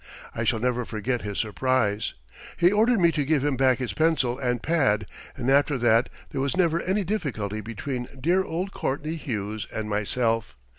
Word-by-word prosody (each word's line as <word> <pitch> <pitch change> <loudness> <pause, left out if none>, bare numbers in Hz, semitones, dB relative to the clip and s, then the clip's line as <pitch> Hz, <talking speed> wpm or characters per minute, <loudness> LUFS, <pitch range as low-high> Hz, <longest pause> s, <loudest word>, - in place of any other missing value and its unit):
I 110 - -2
shall 115 - +2
never 125 +1 0
forget 115 +2 -2
his 100 -1 -5
surprise. 110 -1 0 0.4
He 175 +1 +5
ordered 225 +2 +3
me 170 -2 +5
to 150 -3 0
give 145 -1 +1
him 145 -2 +1
back 130 -1 +3
his 125 -1 -3
pencil 140 -6 +1
and 125 -3 -1
pad, 110 -11 +2 0.3
and 125 -2 -3
after 140 +1 +3
that 120 -1 +3 0.2
there 135 - -2
was 140 +6 -1
never 170 -2 +2
any 195 +3 0
difficulty 125 - -2
between 120 +3 -4
dear 175 +8 +2
old 185 +2 -3
Courtney 150 +1 -2
Hughes 110 -9 -4
and 110 -1 -4
myself. 110 - 0
130 Hz, 180 wpm, -26 LUFS, 110-160 Hz, 0.4 s, He